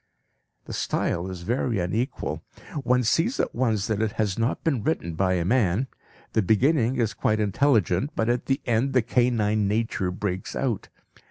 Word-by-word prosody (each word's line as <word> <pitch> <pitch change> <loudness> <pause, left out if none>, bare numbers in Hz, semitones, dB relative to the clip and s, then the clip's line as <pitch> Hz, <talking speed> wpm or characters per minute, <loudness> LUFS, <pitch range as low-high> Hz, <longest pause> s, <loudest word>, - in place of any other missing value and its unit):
The - - -7
style 85 +2 -1
is 90 -2 -7
very 120 +1 0
unequal! 110 +9 -2 0.4
One 125 -1 +2
sees 165 - +1
at - - 0
once 115 -5 +1
that 110 -1 -1
it 110 -2 0
has 105 -4 0
not 115 +5 -1
been 140 -8 +1
written 95 - -1
by 95 +3 +1
a 85 -2 0
man. 105 +1 +2 0.5
The 110 - +3
beginning 120 - +3
is 115 -3 0
quite 110 0 0
intelligent, 105 - +2
but 110 - 0
at 120 0 0
the 135 +1 +1
end 120 +4 +1
the 125 -3 +3
canine 110 -4 +2
nature 105 -3 0
breaks 95 0 -3
out. 120 -7 -2
110 Hz, 170 wpm, -25 LUFS, 100-125 Hz, 0.5 s, The